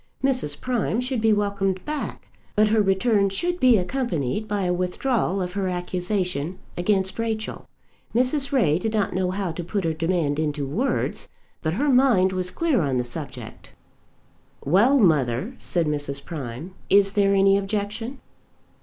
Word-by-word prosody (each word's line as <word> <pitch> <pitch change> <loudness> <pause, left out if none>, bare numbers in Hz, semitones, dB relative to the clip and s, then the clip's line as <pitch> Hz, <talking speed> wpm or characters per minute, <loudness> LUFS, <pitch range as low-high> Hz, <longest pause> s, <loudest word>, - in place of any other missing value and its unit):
Mrs. 250 - 0
Prime 245 -3 -1
should 250 -2 -2
be 220 0 +4
welcomed 200 -2 0
back, 300 -1 -5 0.3
but 215 0 +4
her 220 0 +3
return 200 +1 +2
should 350 - -2
be 250 -3 +6
accompanied 190 - -2
by 205 -2 -1
a 180 -1 +1
withdrawal 190 +2 0
of 180 0 -5
her 195 -1 -1
accusation 180 -2 -2 0.2
against 190 +2 0
Rachel. 220 -1 -3 0.5
Mrs. 270 +3 +2
Ray 180 - +3
did 220 +4 -2
not 210 -3 0
know 185 0 0
how 190 -1 -2
to 170 +2 -5
put 195 +3 -2
her 165 -1 0
demand 160 -3 0
into 150 -2 -1
words, 220 - -2 0.3
but 155 0 -1
her 285 +10 +1
mind 245 -8 +4
was 185 -1 -1
clear 305 - +1
on 135 -4 0
the 125 - +1
subject. 120 -1 -8 0.9
"Well, 205 - +4
mother," 155 - +2
said 170 -2 -1
Mrs. 145 -2 -3
Prime; 150 +2 -6 0.2
"is 200 0 +5
there 200 -1 +3
any 195 0 +5
objection?" 210 +5 -3
195 Hz, 155 wpm, -24 LUFS, 175-225 Hz, 0.9 s, be